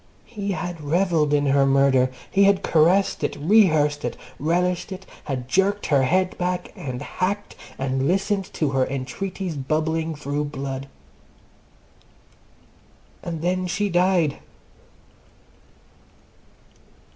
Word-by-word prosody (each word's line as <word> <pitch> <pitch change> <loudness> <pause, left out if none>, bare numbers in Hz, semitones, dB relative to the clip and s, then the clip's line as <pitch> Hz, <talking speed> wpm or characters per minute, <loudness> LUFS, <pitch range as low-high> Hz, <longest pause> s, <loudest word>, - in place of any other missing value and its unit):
He 200 -4 -4
had 175 -3 -5
revelled 160 -1 +1
in 145 -1 +2
her 140 0 +4
murder. 135 -1 +4 0.2
He 200 0 +4
had 200 -1 +3
caressed 175 +5 +3
it, - - -1
rehearsed 155 -5 +3
it, - - -3 0.2
relished 180 +5 0
it, 190 0 -7 0.2
had 130 -4 -4
jerked 195 +8 +1
her 140 -3 +3
head 185 +8 +1
back, 180 0 -2
and 130 -10 -5
hacked, 200 +3 -3 0.2
and 135 0 -1
listened 195 +2 0
to 150 -4 0
her 135 -1 +2
entreaties 175 +7 -4
bubbling 160 +3 -1
through 145 0 -2
blood! 135 -1 -5 2.3
And 165 -2 -5
then 185 +1 0
she 200 +4 -1
died! 175 -4 +2
165 Hz, 115 wpm, -23 LUFS, 140-185 Hz, 2.3 s, her